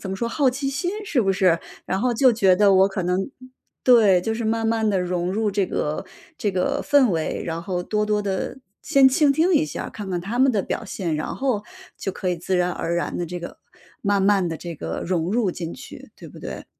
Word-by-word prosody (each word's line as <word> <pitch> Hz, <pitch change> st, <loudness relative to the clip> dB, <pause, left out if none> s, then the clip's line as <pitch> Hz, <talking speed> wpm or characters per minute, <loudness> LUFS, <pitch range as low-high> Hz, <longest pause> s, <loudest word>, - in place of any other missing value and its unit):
怎 195 Hz, -, -6 dB
么 190 Hz, -, -3 dB
说 235 Hz, -, -2 dB
好 265 Hz, +3 st, +2 dB
奇 275 Hz, +2 st, -2 dB
心 350 Hz, +6 st, -2 dB
是 305 Hz, -10 st, +1 dB
不 195 Hz, -4 st, +2 dB
是？ 185 Hz, -3 st, +3 dB, 0.3 s
然 190 Hz, +1 st, -2 dB
后 245 Hz, +1 st, +1 dB
就 255 Hz, +2 st, +5 dB
觉 195 Hz, -5 st, +4 dB
得 200 Hz, -1 st, +5 dB
我 190 Hz, +1 st, +5 dB
可 190 Hz, -1 st, -3 dB
能 180 Hz, +6 st, -1 dB, 0.5 s
对， 215 Hz, -7 st, +6 dB
就 225 Hz, +5 st, -2 dB
是 230 Hz, -, -3 dB
慢 225 Hz, +1 st, 0 dB
慢 225 Hz, -1 st, +1 dB
地 195 Hz, -, +1 dB
融 180 Hz, 0 st, -1 dB
入 215 Hz, +1 st, 0 dB
这 200 Hz, 0 st, +1 dB
个 150 Hz, -4 st, -2 dB, 0.3 s
这 205 Hz, -, -1 dB
个 185 Hz, -1 st, -1 dB
氛 285 Hz, -3 st, +4 dB
围。 160 Hz, -2 st, -2 dB
然 165 Hz, 0 st, -3 dB
后 180 Hz, -2 st, -2 dB
多 210 Hz, -1 st, 0 dB
多 210 Hz, 0 st, +1 dB
地 200 Hz, +5 st, -3 dB, 0.2 s
先 275 Hz, -3 st, +5 dB
倾 285 Hz, +2 st, +3 dB
听 330 Hz, +6 st, +3 dB
一 305 Hz, 0 st, +4 dB
下， -, -, -5 dB
看 200 Hz, -3 st, -7 dB
看 175 Hz, -, -1 dB
他 220 Hz, +8 st, -2 dB
们 265 Hz, 0 st, +5 dB
的 215 Hz, -5 st, +1 dB
表 220 Hz, -, -4 dB
现， 180 Hz, -5 st, -3 dB
然 155 Hz, -, -3 dB
后 255 Hz, -6 st, 0 dB, 0.3 s
就 195 Hz, -, -3 dB
可 185 Hz, -, -4 dB
以 180 Hz, -, 0 dB
自 180 Hz, +2 st, -1 dB
然 180 Hz, 0 st, +2 dB
而 170 Hz, 0 st, -2 dB
然 175 Hz, -, -2 dB
地 175 Hz, -, -2 dB
这 175 Hz, +2 st, -6 dB
个 175 Hz, -, -9 dB, 0.4 s
慢 200 Hz, -1 st, +2 dB
慢 195 Hz, -2 st, +3 dB
地 165 Hz, -, -4 dB
这 170 Hz, +1 st, -7 dB
个， -, -, -5 dB
融 170 Hz, -1 st, 0 dB
入 215 Hz, -4 st, +1 dB
进 170 Hz, -1 st, -5 dB
去， -, -, -11 dB
对 -, -, -11 dB
不 -, -, -13 dB
对？ -, -, -7 dB
200 Hz, 255 characters per minute, -23 LUFS, 180-235 Hz, 0.5 s, 对